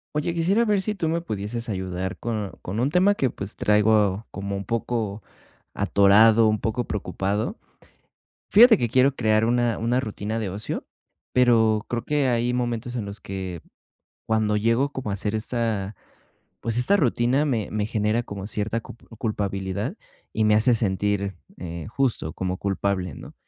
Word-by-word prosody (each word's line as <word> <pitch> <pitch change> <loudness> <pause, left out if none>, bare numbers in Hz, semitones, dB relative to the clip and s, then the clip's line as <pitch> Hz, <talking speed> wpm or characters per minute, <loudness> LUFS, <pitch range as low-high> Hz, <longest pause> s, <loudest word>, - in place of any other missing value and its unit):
Oye, 150 +3 0
quisiera 180 +7 +2
ver 205 -3 +2
si 210 +2 -2
tú 165 -5 -1
me 165 +1 0
pudieses 115 - -4
ayudar 95 -2 -3
con 110 -4 -3
con 100 +5 -4
un 130 +4 +2
tema 185 +5 +4
que 130 - +1
pues, 100 -2 -6
traigo 105 -1 +2
como 100 0 -4
un 100 0 -5
poco 110 -1 -2 0.5
atorado, 105 +3 +5
un 110 -1 +1
poco 115 +3 -2
preocupado. 105 - -2 0.9
Fíjate 225 +2 +8
que 120 - -1
quiero 130 +3 +3
crear 110 -3 +2
una 120 0 +1
una 120 +3 +1
rutina 110 -2 -4
de 105 -4 -3
ocio, 100 +3 -4 0.5
pero 115 -4 +3
creo 120 -1 -2
que 145 -2 +1
hay 120 0 +1
momentos 120 0 -2
en 115 - -2
los 100 +1 -8
que, 95 -3 -6 0.6
cuando 110 -1 +1
llego 115 +6 +1
como 130 -7 -4
a - - -1
hacer 105 +2 -2
esta, 110 -3 -2 0.7
pues, 115 0 -2
esta 125 +12 +4
rutina, 130 - +2
me 120 -8 -1
me 105 -1 -1
genera 110 +2 0
como 100 -2 -7
cierta 110 +2 -2
cup 110 - -14
culpabilidad 100 -4 -2 0.4
y 110 - +1
me 105 0 +4
hace 110 +3 +4
sentir, 100 -2 0 0.2
eh, 85 -2 -6
justo, 120 - -1
como 95 0 -3
culpable, 95 -3 -1
¿no? - - -11
110 Hz, 165 wpm, -24 LUFS, 100-120 Hz, 0.9 s, Fíjate